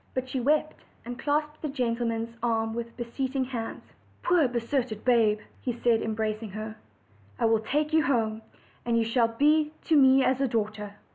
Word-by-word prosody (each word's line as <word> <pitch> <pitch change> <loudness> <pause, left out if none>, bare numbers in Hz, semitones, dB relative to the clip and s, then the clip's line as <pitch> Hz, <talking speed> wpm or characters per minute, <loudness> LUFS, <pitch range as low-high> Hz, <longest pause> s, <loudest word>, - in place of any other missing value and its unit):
But 255 0 -2
she 260 0 -2
wept, 300 +4 0 0.2
and 245 +1 -6
clasped 300 +1 -1
the 310 - -2
gentleman's 230 -3 -2
arm 225 -1 0
with 235 0 -6
beseeching 260 +2 -2
hands. 235 -3 -5 0.4
"Poor 345 -5 +4
deserted 240 -2 -2
babe!" 230 -4 +4 0.2
he 250 - -1
said, 235 -1 +1
embracing 220 0 -2
her; 215 +1 -5 0.6
"I - - +1
will 225 -1 +4
take 295 +7 -1
you 320 -1 +4
home, 225 -4 0 0.4
and 235 -1 +1
you 230 - +3
shall 230 +1 +2
be 300 +6 +2
to 320 - +2
me 265 -1 +6
as 260 +1 +1
a 275 - +3
daughter." 210 -3 -3
240 Hz, 170 wpm, -27 LUFS, 225-270 Hz, 0.6 s, me